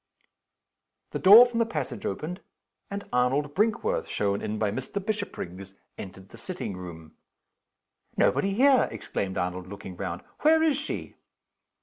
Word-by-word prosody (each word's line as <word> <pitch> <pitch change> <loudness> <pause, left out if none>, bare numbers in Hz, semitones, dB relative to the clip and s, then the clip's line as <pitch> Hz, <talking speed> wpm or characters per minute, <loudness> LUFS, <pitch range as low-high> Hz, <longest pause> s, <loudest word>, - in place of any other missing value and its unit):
The - - -3
door 210 +6 +10
from 240 -1 -2
the 230 - +3
passage 215 - -4
opened, 165 - -4 0.5
and 200 0 -6
Arnold 135 +4 +1
Brinkworth 235 - 0
shown 100 -1 -1
in 110 - -3
by 105 -2 0
Mr. 130 +5 -6
Bishopriggs 100 - -5 0.2
entered 95 0 -10
the 115 - -13
sitting 180 - -5
room. 85 -3 -9 1.1
"Nobody 195 - +2
here!" 265 +2 +5
exclaimed 95 0 -4
Arnold, 90 +1 -3
looking 95 -1 -8
round. 85 0 -5 0.2
"Where 320 +1 +4
is 310 -3 +3
she?" 300 - -5
130 Hz, 135 wpm, -27 LUFS, -, 1.1 s, door